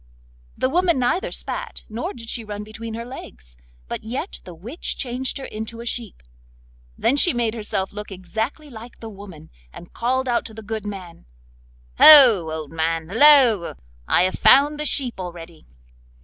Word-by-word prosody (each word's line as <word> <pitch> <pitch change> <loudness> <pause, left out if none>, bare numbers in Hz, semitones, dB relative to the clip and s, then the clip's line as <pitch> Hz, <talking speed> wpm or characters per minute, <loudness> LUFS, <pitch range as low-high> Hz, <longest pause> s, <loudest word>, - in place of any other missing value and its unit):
The - - +1
woman 340 +2 +2
neither 255 +9 0
spat, - - -6
nor 225 +3 -4
did 230 -2 -10
she 230 0 -3
run 210 -1 -6
between 220 +1 -8
her 230 +1 -6
legs, - - -11 0.3
but - - -5
yet 255 - -5
the 180 - -10
witch 235 - -6
changed 255 +1 -3
her 270 - -7
into 220 +2 -7
a 235 - -8
sheep. 230 - -5 0.7
Then 260 - +2
she 315 +3 +4
made 235 -2 0
herself 210 -4 -3
look 210 0 -8
exactly 220 - -5
like 235 +1 -12
the 225 -1 -8
woman, 190 -6 -13 0.2
and 170 - -13
called 260 +2 -1
out 240 -1 +1
to 220 - -10
the 220 - -9
good 215 0 -5
man: 185 - -9 0.7
'Ho, 245 - +9
old 155 -2 -6
man, 165 0 -2
halloa! 240 - +5 0.3
I - - +4
have 185 - -1
found 290 +3 +5
the 300 - -2
sheep 255 -8 -1
already! 170 -2 -9
225 Hz, 170 wpm, -22 LUFS, 190-255 Hz, 0.7 s, Ho